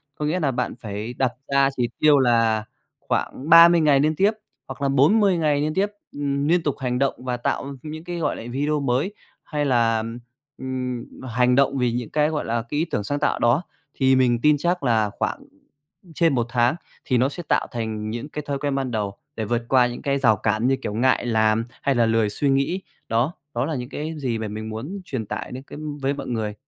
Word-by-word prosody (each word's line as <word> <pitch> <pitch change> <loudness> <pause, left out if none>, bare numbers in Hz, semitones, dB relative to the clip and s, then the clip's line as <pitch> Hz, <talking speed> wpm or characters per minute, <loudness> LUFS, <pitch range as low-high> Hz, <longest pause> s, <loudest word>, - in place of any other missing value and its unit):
Có 150 - -3
nghĩa 160 +5 0
nà 145 -5 +1
bạn 125 - -2
phải 105 +2 -5
đặt 130 -1 0 0.2
ra 140 0 +4
chỉ 120 -2 0
tiêu 150 -2 +5
là 115 -3 +3 0.4
khoảng 145 +5 -3
30 170 0 +8
ngày 145 -3 +4
liên 155 +2 +2
tiếp 200 +6 +3 0.4
hoặc 135 +1 -8
là 140 - +1
40 180 +8 +4
ngày 150 -3 +1
liên 155 +1 -1
tiếp, 195 +2 +2 0.2
ừm, 140 0 -1
niên 175 0 +3
tục 145 -4 0
hành 125 -1 -1
động 135 -1 +2
và 125 -1 -1
tạo 140 +3 -2
những 155 +1 -7
cái, 175 0 -5
gọi 165 - -1
là, - - -8
video 145 +3 0
mới. 140 +8 0 0.3
Hay 150 -2 -2
là, 115 -4 +3
ừm, 115 +1 -5 0.4
ừm, 125 -2 -4 0.3
hành 125 +2 +3
động 140 0 +3
vì 125 -2 +1
những 120 -1 -3
cái, 150 0 +2
gọi 155 -2 -2
là, 115 0 -1
cái 145 - -2
ý 165 - +1
tưởng 105 - -1
sáng 145 +8 -2
tạo - - 0
đó, 120 +7 +3 0.3
thì 130 -1 +3
mình 120 -2 +3
tin 150 +1 +4
chắc 175 +1 -1
là 110 -4 +2
khoảng - - -1 0.8
trên 165 -4 +3
1 120 -1 +1
tháng 120 +3 +2 0.3
thì 130 - +2
nó 130 +3 +3
sẽ 175 +4 -7
tạo - - +2
thành 110 -3 -3
những 120 +6 -5
cái 150 - -5
thói 140 -1 -1
quen 145 -2 -1
ban 135 -2 -2
đầu, 105 -3 -3 0.2
để 110 - -3
vượt 120 +2 0
qua 125 -2 +5
những 120 - -6
cái 140 0 0
rào 110 -5 +4
cản 110 +4 0
như 135 - +3
kiểu 105 - -4
ngại 125 +2 +2
làm 110 -1 +2 0.2
hay 140 -2 +1
là 120 - +4
lười 115 -1 +2
suy 140 +7 0
nghĩ. 140 +8 +1 0.3
Đó, 120 +9 +1 0.2
đó 120 +2 0
là 160 +1 -2
những 125 -1 -5
cái 155 +3 -4
gì 120 -5 -1
mà 110 - -3
mình 110 +1 -6
muốn 145 - -6
truyền 130 -9 -4
tải - - -5
đến 130 +1 -7
cái 145 - -10 0.2
với 135 +1 +1
mọi 145 - -6
người. 110 -3 -2
130 Hz, 230 wpm, -23 LUFS, 115-150 Hz, 0.8 s, 30